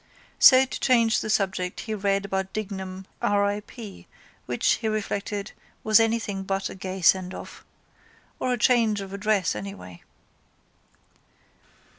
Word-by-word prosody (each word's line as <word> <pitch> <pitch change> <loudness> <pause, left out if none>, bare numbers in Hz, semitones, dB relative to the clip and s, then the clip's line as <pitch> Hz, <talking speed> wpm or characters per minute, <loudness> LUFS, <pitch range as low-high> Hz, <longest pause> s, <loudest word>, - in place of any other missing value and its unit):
So 260 0 +8
to 260 - -6
change 230 -4 +3
the - - -4
subject 190 -3 -1
he 220 - -5
read 200 -1 0
about 190 -1 -3
Dignam 190 -3 -5 0.2
R. 205 0 +2
I. 205 +1 -1
P. 210 -1 -11 0.4
which, - - -3
he 225 - -3
reflected, 205 -1 -3 0.3
was 215 +1 +5
anything 225 -3 0
but 195 0 -2
a - - -7
gay 190 0 -6
sendoff. 185 +1 +1 0.8
Or 255 - -1
a 250 - +1
change 225 -2 +3
of 195 0 -8
address 200 - 0
anyway. 95 -4 -8
200 Hz, 135 wpm, -25 LUFS, 190-220 Hz, 0.8 s, So